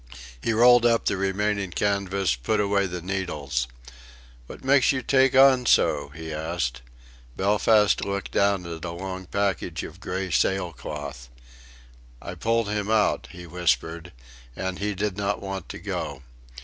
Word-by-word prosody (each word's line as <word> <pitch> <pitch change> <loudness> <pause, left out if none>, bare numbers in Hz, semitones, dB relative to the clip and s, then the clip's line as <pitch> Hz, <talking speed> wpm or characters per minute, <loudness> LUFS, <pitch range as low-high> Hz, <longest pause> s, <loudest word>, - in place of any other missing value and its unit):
He - - 0
rolled 120 +1 +6
up 115 -1 +3
the - - +1
remaining 100 +1 -1
canvas, 100 -2 0
put 60 - -1
away 100 -1 +2
the 90 -2 -6
needles. 75 -9 -2 0.8
"What - - -11
makes 135 0 +4
you 130 -2 -2
take 135 +1 +3
on 130 -2 +6
so?" 70 - +3
he 80 +2 -7
asked. 75 -6 -3 0.6
Belfast 105 +1 +3
looked 100 0 -3
down 100 -2 +2
at 85 -1 -6
the 85 0 -5
long 95 +1 -6
package 95 -3 -1
of 85 +3 -9
grey 95 0 -4
sailcloth. 75 -10 -2 0.9
"I - - -7
pulled 115 -1 0
him 105 0 -2
out," 110 -2 +2
he 90 0 -10
whispered, 85 0 -1 0.4
"and 95 -1 -4
he 105 0 -2
did 100 0 -2
not 100 0 -1
want 95 -3 -6
to - - -6
go. 70 -2 -5
95 Hz, 150 wpm, -25 LUFS, 85-105 Hz, 0.9 s, rolled